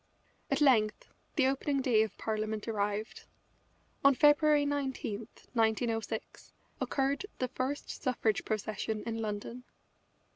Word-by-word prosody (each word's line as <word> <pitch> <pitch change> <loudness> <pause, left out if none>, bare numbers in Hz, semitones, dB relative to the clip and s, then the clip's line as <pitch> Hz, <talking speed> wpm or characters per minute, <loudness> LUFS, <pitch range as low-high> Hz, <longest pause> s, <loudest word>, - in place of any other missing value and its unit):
At 275 +1 +1
length 220 -7 +3 0.3
the 280 - +4
opening 275 +1 +1
day 245 -5 +3
of 220 -2 -2
Parliament 215 0 -2
arrived. 210 0 -2 0.8
On 275 -1 +6
February 295 +1 +5
19, 265 -7 -2 0.3
1906, 225 -1 -1 0.3
occurred 280 +7 0
the 255 - -1
first 260 +3 -4
suffrage 235 -5 +1
procession 215 0 -2
in 225 -1 -3
London. 220 +3 -4
230 Hz, 110 wpm, -32 LUFS, 215-275 Hz, 0.8 s, On